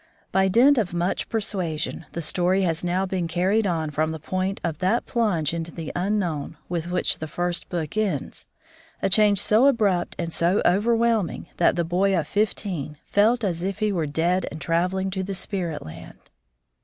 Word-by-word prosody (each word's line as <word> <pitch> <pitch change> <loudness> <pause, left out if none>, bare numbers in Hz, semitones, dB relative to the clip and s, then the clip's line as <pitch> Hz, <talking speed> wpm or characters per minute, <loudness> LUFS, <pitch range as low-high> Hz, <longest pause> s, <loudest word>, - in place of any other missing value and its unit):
By 190 0 +3
dint 245 +8 +5
of 180 -5 -2
much 175 +2 -1
persuasion, 185 -8 -2
the 170 - -3
story 180 +5 +2
has 165 -2 0
now 180 +2 0
been 185 -2 -2
carried 190 +6 +1
on 160 -4 -1
from 155 +2 0
the 160 - -5
point 185 +5 -2
of 170 -2 -2
that 190 +6 +1
plunge 180 - 0
into 170 0 -4
the 165 -2 -6
unknown 175 -6 -1
with 170 -1 -3
which 180 - 0
the 155 - -4
first 175 +2 -2
book 170 0 -3
ends, 215 -2 -2 0.6
a - - +3
change 205 +1 +4
so 220 +9 +4
abrupt 205 -9 +1
and 170 -1 -3
so 175 +4 +2
overwhelming 225 0 +1
that 175 - +3
the 170 - 0
boy 185 +3 +2
of 160 - 0
fifteen 185 -8 -2
"felt 225 +4 +3
as 175 -4 -1
if 195 0 -2
he 215 -1 +1
were 165 -5 -1
dead 170 +5 0
and 160 - -8
travelling 180 +5 0
to 190 0 -2
the 195 +1 -4
spirit 180 -5 -3
land." 80 - -10
180 Hz, 180 wpm, -24 LUFS, 165-200 Hz, 0.6 s, dint